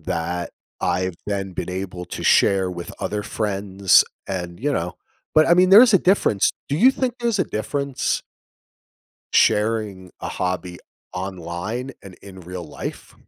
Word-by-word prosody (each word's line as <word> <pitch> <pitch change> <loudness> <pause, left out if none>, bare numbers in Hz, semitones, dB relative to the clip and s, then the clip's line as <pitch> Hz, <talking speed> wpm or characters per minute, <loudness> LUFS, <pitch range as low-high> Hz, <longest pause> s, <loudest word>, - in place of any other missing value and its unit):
that 85 +1 -3 0.3
I've 90 0 0
then 100 -2 -3
been 90 - -4
able 90 -1 -5
to - - -6
share 95 -2 +3
with 85 -1 -7
other 105 0 -2
friends 100 -3 +2 0.2
and, 90 -2 -5
you 145 +4 0
know 90 -7 -2 0.4
but, 155 0 +5
I 170 - +6
mean, 180 +1 +4
there's 220 +3 +9
a - - +7
difference. 180 - +2 0.2
Do 145 - 0
you 245 +11 +6
think 255 -2 -1
there's 235 -4 0
a - - +2
difference 140 +5 -2 1.1
sharing 105 -4 +1
a - - -4
hobby 90 -1 -3 0.4
online 95 +7 -5
and 100 - -11
in 95 -2 -12
real 90 0 -7
life? 75 - -8
100 Hz, 150 wpm, -22 LUFS, 90-130 Hz, 1.1 s, there's